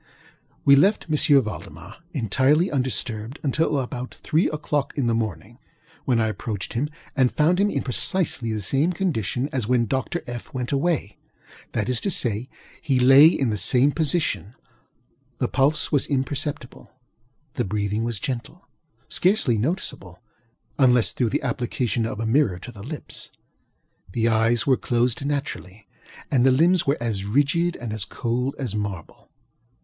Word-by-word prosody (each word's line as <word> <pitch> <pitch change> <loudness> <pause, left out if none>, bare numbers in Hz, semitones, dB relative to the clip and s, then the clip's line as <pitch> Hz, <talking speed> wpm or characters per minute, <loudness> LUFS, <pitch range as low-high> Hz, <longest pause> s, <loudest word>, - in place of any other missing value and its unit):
We 140 - +8
left 195 +9 +3
M. 145 -2 +4
Valdemar 95 -2 -8
entirely 140 - +2
undisturbed 125 -2 -2
until 150 +1 +1
about 125 -1 -4
three 160 +4 +1
oŌĆÖclock 150 -2 -2
in 140 - 0
the 115 - +1
morning, 110 - -4 0.5
when 125 -3 +2
I 110 - +2
approached 105 -2 -5
him 140 +6 -1 0.3
and 130 -4 +3
found 170 +4 +2
him 205 +1 +3
in - - -2
precisely 135 - 0
the 105 -2 -2
same 145 - +2
condition 140 - -1
as 125 -5 -2
when 125 -1 +2
Dr. 135 +9 -2
FŌĆöŌĆö 120 -1 -8
went 125 -2 -3
awayŌĆöthat 135 - -4
is 125 -2 +1
to - - -1
say, 120 - 0 0.3
he 135 -4 +1
lay 135 +4 +8
in 135 -7 +1
the 105 - -2
same 125 +9 +4
position; 150 - -1 0.8
the - - 0
pulse 145 +3 +1
was 145 -3 +2
imperceptible; 140 0 -3 0.6
the 125 - -1
breathing 105 +1 -2
was 115 -3 -2
gentle 130 - -6 0.4
(scarcely 185 - +2
noticeable, 105 - -3 0.6
unless 125 -3 +4
through 120 -3 0
the - - -2
application 120 -2 -1
of 110 - -6
a 115 - -2
mirror 110 -5 +2
to 110 +7 -9
the 105 -4 -12
lips); 145 +8 -8 0.8
the 115 0 +1
eyes 115 +1 +2
were 130 -2 +3
closed 120 +2 0
naturally; 110 - -4 0.4
and 125 -3 +3
the 130 - +5
limbs 170 +6 +3
were 140 - +2
as 110 -5 -2
rigid 145 +10 +1
and 115 -3 -6
as 110 -3 -1
cold 125 +4 -2
as 130 -7 -3
marble. 100 -5 -6
125 Hz, 155 wpm, -23 LUFS, 110-145 Hz, 0.8 s, We